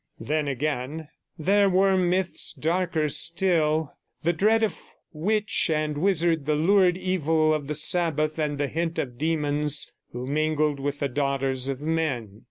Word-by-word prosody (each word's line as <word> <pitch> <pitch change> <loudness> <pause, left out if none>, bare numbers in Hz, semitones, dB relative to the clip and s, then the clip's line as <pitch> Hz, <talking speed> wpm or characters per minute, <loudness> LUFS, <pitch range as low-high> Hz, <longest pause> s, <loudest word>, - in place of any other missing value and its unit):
Then, 150 0 -2
again, 145 +2 -3 0.3
there 200 +5 +3
were 190 +1 +3
myths 180 -2 +1
darker 165 -1 -1
still; 160 -1 +1 0.3
the 170 +2 +2
dread 215 +6 +2
of 220 - -1 0.3
witch 210 +5 0
and 155 -1 -1
wizard, 165 -3 +1
the 150 - +2
lurid 180 +3 +3
evil 160 -4 +1
of 150 -2 -3
the 150 - -1
Sabbath, 155 -1 +2
and 150 -2 -1
the 145 0 -1
hint 165 +3 -3
of 125 -6 -4
demons 150 -2 +1 0.2
who 125 +1 -6
mingled 155 0 0
with 140 +1 -3
the 140 - +1
daughters 135 -1 -1
of 135 0 -4
men. 140 -10 -2
155 Hz, 150 wpm, -25 LUFS, 145-175 Hz, 0.3 s, there